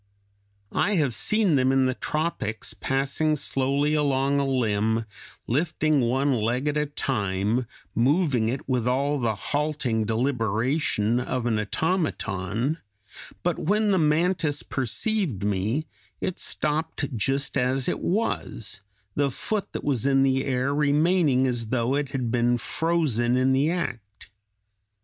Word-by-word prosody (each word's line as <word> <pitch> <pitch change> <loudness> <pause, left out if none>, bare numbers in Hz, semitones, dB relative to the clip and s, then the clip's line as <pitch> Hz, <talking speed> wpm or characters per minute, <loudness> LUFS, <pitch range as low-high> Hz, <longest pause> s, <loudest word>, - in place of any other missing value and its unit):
I 205 +2 +2
have 145 -8 +1
seen 205 - +2
them 130 0 +3
in 135 0 +3
the 130 - +1
tropics 150 -7 -2
passing 140 +3 0
slowly 140 +1 0
along 140 -1 +2
a 140 - 0
limb, 110 -3 +1 0.4
lifting 155 +2 +1
one 135 +4 +1
leg 120 +4 0
at 150 - 0
a 150 0 +1
time, 110 -3 -1 0.3
moving 130 -2 +2
it 130 +3 -4
with 125 -3 0
all 140 +3 +1
the 115 -3 0
halting 140 -2 -1
deliberation 115 0 0
of 125 -1 -2
an 110 -3 +1
automaton; 120 - -1 0.6
but - - 0
when 210 +4 +2
the 190 - +3
mantis 155 0 +1
perceived 135 - -1
me, 105 +9 0 0.3
it 185 - -3
stopped 150 -2 -2
just 135 +6 0
as 130 0 +1
it - - -1
was, 170 - -2 0.3
the 145 -1 +1
foot 205 - -2
that - - -5
was 135 -3 0
in 135 -1 +4
the 135 0 +2
air 130 +1 0
remaining 150 -1 +3
as 120 -3 0
though 120 +2 0
it 145 -1 -1
had 130 -4 -2
been 120 0 +2
frozen 125 -5 +1
in 130 +1 +3
the 140 +4 +2
act. 115 - -5
135 Hz, 135 wpm, -25 LUFS, 120-150 Hz, 0.6 s, in